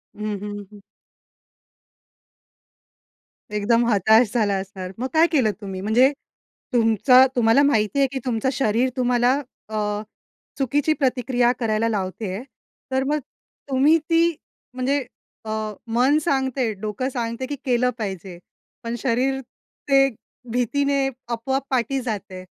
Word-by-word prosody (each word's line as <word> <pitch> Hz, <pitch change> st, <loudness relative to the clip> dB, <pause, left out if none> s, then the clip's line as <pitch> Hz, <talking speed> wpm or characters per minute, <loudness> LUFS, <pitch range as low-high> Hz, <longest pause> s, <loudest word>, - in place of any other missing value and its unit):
हं, 210 Hz, -1 st, -3 dB
हं, 205 Hz, 0 st, -5 dB
हं. 205 Hz, -, -13 dB, 2.8 s
एकदम 230 Hz, +3 st, +2 dB
हताश 220 Hz, +1 st, +4 dB
झाला 215 Hz, -5 st, +2 dB
असणार. 190 Hz, -1 st, -7 dB
मग 255 Hz, +3 st, -2 dB
काय 325 Hz, +2 st, +5 dB
केलं 250 Hz, -9 st, +3 dB
तुम्ही? 190 Hz, -2 st, -6 dB
म्हणजे 240 Hz, +6 st, +4 dB, 0.6 s
तुमचा 240 Hz, +3 st, +5 dB
तुम्हाला 230 Hz, +2 st, +4 dB
माहिती 225 Hz, -1 st, +2 dB
आहे 275 Hz, -, +4 dB
की 270 Hz, -, -3 dB
तुमचं 245 Hz, +1 st, 0 dB
शरीर 245 Hz, 0 st, +1 dB
तुम्हाला 245 Hz, 0 st, +3 dB, 0.4 s
अ, 210 Hz, -1 st, -2 dB, 0.6 s
चुकीची 290 Hz, +3 st, +1 dB
प्रतिक्रिया 250 Hz, -3 st, +1 dB
करायला 225 Hz, -1 st, +1 dB
लावते 200 Hz, 0 st, -3 dB
आहे, 230 Hz, -, -6 dB, 0.5 s
तर 265 Hz, 0 st, +1 dB
मग 300 Hz, +1 st, +1 dB, 0.5 s
तुम्ही 280 Hz, +5 st, +4 dB
ती 335 Hz, 0 st, +3 dB, 0.4 s
म्हणजे 265 Hz, +3 st, 0 dB, 0.5 s
अ, -, -, -6 dB, 0.4 s
मन 250 Hz, +6 st, +3 dB
सांगते, 265 Hz, -5 st, 0 dB
डोकं 215 Hz, +6 st, -3 dB
सांगते 235 Hz, 0 st, -3 dB
की 290 Hz, -, -3 dB
केलं 250 Hz, 0 st, +2 dB
पाहिजे. 190 Hz, -5 st, -5 dB, 0.5 s
पण 230 Hz, +1 st, -3 dB
शरीर 260 Hz, +2 st, 0 dB, 0.5 s
ते 270 Hz, 0 st, +6 dB, 0.4 s
भीतीने 275 Hz, +3 st, +1 dB, 0.3 s
आपोआप 265 Hz, +4 st, -2 dB
पाठी 260 Hz, +1 st, 0 dB
जातंय. 195 Hz, -5 st, -5 dB
240 Hz, 120 wpm, -23 LUFS, 215-265 Hz, 2.8 s, ते